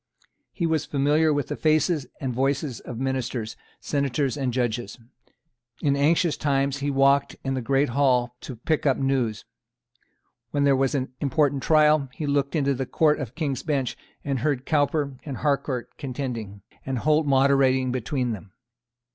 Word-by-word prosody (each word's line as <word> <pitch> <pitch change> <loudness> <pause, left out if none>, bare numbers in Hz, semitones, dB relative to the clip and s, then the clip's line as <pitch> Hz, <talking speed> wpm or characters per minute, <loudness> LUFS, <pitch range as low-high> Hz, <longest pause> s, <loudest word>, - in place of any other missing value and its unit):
He 170 - -2
was 160 -2 0
familiar 150 +3 +2
with 145 -1 -1
the - - -2
faces 155 -1 +1
and 130 -3 -3
voices 135 0 -1
of 120 - -8
ministers, 125 -3 -2 0.2
senators 140 -1 -1
and 135 -3 -1
judges. 120 -3 -2 0.8
In 140 -1 +1
anxious 160 +4 +2
times 140 -1 0
he 140 +1 -1
walked 140 0 +3
in 135 - -1
the 130 - -2
great 135 +3 +1
Hall 125 -2 +2
to 130 - -7
pick 150 +6 -1
up 135 - +3
news. 130 -6 -1 1.0
When 145 -1 0
there 140 -1 +4
was 135 +1 +1
an 130 -2 -2
important 145 -1 +1
trial, 150 -2 +4
he 155 - -4
looked 140 +1 0
into 140 -2 +2
the 135 0 -3
Court 155 +1 +2
of 130 -4 -6
King's 140 -5 -2
Bench, 140 -6 -1 0.3
and 135 -2 -1
heard 135 0 -1
Cowper 145 -3 0
and 140 -4 -5
Harcourt 135 -4 -1
contending, 120 -7 -5 0.2
and 130 -1 -3
Holt 150 +4 +2
moderating 135 -1 +3
between 125 0 -1
them. 105 -3 -8
135 Hz, 160 wpm, -25 LUFS, 130-145 Hz, 1.0 s, there